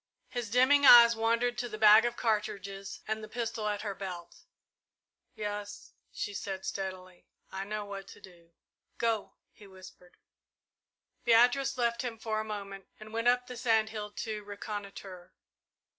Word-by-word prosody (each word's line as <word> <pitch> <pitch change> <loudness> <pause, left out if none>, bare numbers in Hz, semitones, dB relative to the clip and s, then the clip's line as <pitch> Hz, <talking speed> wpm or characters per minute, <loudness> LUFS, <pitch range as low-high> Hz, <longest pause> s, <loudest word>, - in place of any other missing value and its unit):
His 245 -4 -4
dimming 260 +5 +4
eyes 235 -3 +9
wandered 235 +2 0
to 245 - -3
the 215 - -6
bag 215 +1 +7
of 240 0 -1
cartridges 200 -3 -3
and 220 0 -3
the - - -7
pistol 230 -2 -3
at 205 0 -2
her 205 -2 -3
belt. 180 -3 -8 0.9
"Yes," 205 -1 -6 0.2
she 205 - -5
said 195 -1 -5
steadily, 185 -2 -6 0.2
"I 190 0 -5
know 210 0 -4
what 200 -1 -8
to - - -13
do." 170 -3 -17 0.5
"Go!" 225 -3 -1 0.2
he 205 - -16
whispered. 185 -1 -15 1.1
Beatrice 250 +4 +4
left 235 -1 0
him 240 -3 -5
for 220 -1 -2
a - - -2
moment 200 -2 -7
and 215 0 -12
went 230 +1 -1
up 245 0 +3
the 250 - -8
sand 225 -3 +2
hill 210 -2 -6
to 215 -1 -5
reconnoitre. 200 -3 -8
215 Hz, 155 wpm, -30 LUFS, 200-235 Hz, 1.1 s, eyes